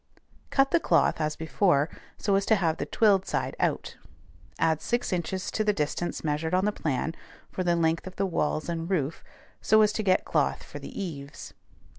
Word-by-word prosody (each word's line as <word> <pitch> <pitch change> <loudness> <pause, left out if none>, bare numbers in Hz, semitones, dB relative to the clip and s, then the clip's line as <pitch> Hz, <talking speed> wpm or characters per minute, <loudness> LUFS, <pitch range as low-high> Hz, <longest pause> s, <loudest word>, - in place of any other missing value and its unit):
Cut 270 0 +3
the 340 - +4
cloth, 165 - +2
as 155 0 0
before, 160 -2 +2 0.3
so 200 - 0
as 195 0 +3
to 220 - +5
have 165 -5 0
the - - -3
twilled 205 -5 +3
side - - -2
out. - - -1 0.6
Add 160 -1 +1
six 240 -4 -1
inches 180 +2 -2
to 215 - 0
the 210 -1 +2
distance 155 +3 -2
measured 160 +3 0
on 185 +2 +2
the 210 - +2
plan, 155 -3 -2 0.4
for 185 - -2
the 175 -1 +2
length 165 +1 +1
of 185 - -9
the 195 - 0
walls 155 -4 -1
and 165 0 -3
roof, 160 -5 -1 0.4
so 215 0 +5
as 210 0 +2
to 220 - -1
get 190 -3 +2
cloth - - 0
for - - -9
the - - -8
eaves. 145 -7 -7
175 Hz, 195 wpm, -27 LUFS, 160-200 Hz, 0.6 s, to